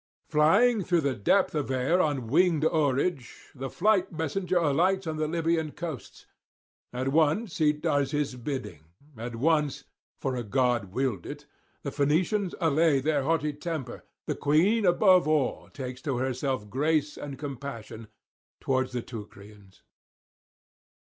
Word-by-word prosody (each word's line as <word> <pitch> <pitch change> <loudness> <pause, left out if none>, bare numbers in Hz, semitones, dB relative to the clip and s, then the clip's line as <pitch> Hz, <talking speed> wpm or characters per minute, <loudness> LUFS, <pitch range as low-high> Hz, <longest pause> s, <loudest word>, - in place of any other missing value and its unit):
Flying 200 +9 +4
through 175 -1 +2
the 140 -2 0
depth 125 - +2
of 150 -4 -2
air 135 +8 +2
on 145 -7 -1
winged 160 +4 +3
oarage, 145 -3 -1
the 135 0 -5
fleet 195 +2 +2
messenger 175 +3 -1
alights 175 +5 +2
on 160 -1 -3
the 155 0 0
Libyan 165 -1 0
coasts. 160 -7 -7 0.7
At 130 +2 -2
once 160 +6 +1
he 150 -1 +4
does 145 -2 0
his 145 -2 -1
bidding; 125 - -6 0.3
at 115 +1 -6
once, 150 +2 +1 0.4
for 130 - -2
a 125 - -2
god 120 0 +1
willed 120 -6 -2
it, 145 0 -8 0.4
the 140 - -3
Phoenicians 170 +8 +1
allay 160 -3 +3
their 145 +1 +1
haughty 150 +1 0
temper; 145 -4 -5 0.2
the - - -1
queen 185 +9 +2
above 180 -1 +5
all 155 -4 0
takes 130 -1 -7
to 140 -5 -2
herself 130 -3 -2
grace 150 +5 0
and 140 -2 -7
compassion 130 -6 -7 0.5
towards 130 -1 -1
the 120 -2 -3
Teucrians. 105 -3 -12
145 Hz, 140 wpm, -27 LUFS, 130-165 Hz, 0.7 s, above